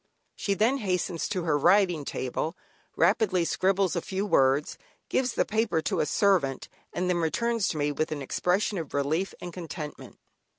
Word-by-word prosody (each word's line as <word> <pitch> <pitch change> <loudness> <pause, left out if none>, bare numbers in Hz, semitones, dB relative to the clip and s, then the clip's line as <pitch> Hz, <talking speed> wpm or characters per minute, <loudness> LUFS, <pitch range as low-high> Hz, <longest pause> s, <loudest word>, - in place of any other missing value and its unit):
She 200 - -1
then 230 +7 +2
hastens 180 -5 -1
to 185 -4 -2
her 155 -3 +1
writing 175 0 +3
table, 150 +8 -3 0.4
rapidly 185 -5 +3
scribbles 190 +1 +1
a 170 - 0
few 190 +3 -3
words, 135 -5 +2 0.3
gives 255 -2 +1
the - - +1
paper 215 -6 +1
to - - -1
a - - +1
servant, 185 - +2 0.2
and 180 +1 -2
then 180 -1 +1
returns 225 +6 0
to 160 - -2
me 145 0 +1
with 155 +2 -2
an 145 -2 -3
expression 180 +7 0
of 155 -4 -6
relief 155 +7 0
and 175 -1 -7
contentment. 160 -3 -7
180 Hz, 170 wpm, -27 LUFS, 155-200 Hz, 0.4 s, writing